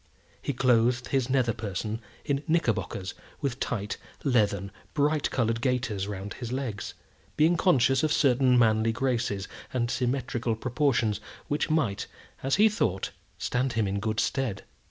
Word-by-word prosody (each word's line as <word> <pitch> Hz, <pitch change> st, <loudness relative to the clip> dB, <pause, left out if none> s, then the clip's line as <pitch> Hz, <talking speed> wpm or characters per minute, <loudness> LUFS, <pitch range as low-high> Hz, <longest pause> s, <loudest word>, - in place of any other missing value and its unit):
He -, -, -1 dB
clothed 125 Hz, -1 st, +2 dB
his 135 Hz, -2 st, +1 dB
nether 130 Hz, -3 st, +2 dB
person 105 Hz, +2 st, -4 dB, 0.2 s
in 140 Hz, -2 st, 0 dB
knickerbockers, 115 Hz, -, 0 dB, 0.3 s
with 135 Hz, -2 st, -2 dB
tight, 105 Hz, -4 st, -2 dB, 0.3 s
leathern, 100 Hz, -7 st, +2 dB, 0.2 s
bright 150 Hz, 0 st, +2 dB
coloured 115 Hz, -2 st, 0 dB
gaiters 125 Hz, -7 st, 0 dB
round 100 Hz, 0 st, -5 dB
his 120 Hz, -2 st, -6 dB
legs, 130 Hz, -6 st, -3 dB, 0.4 s
being 160 Hz, +3 st, +5 dB
conscious 135 Hz, -7 st, +4 dB
of 155 Hz, -1 st, +1 dB
certain 130 Hz, -3 st, +4 dB
manly 110 Hz, -1 st, +4 dB
graces 120 Hz, -6 st, -1 dB, 0.2 s
and 120 Hz, -2 st, 0 dB
symmetrical 125 Hz, -2 st, -1 dB
proportions 120 Hz, -3 st, +1 dB, 0.3 s
which 145 Hz, +2 st, 0 dB
might, 140 Hz, -11 st, +1 dB, 0.3 s
as 135 Hz, +1 st, +2 dB
he 210 Hz, +2 st, +6 dB
thought, 105 Hz, -, 0 dB, 0.3 s
stand 125 Hz, 0 st, 0 dB
him 110 Hz, -2 st, +1 dB
in 100 Hz, +1 st, -1 dB
good 110 Hz, +1 st, -1 dB
stead. 125 Hz, -8 st, -1 dB
120 Hz, 140 wpm, -28 LUFS, 110-135 Hz, 0.4 s, he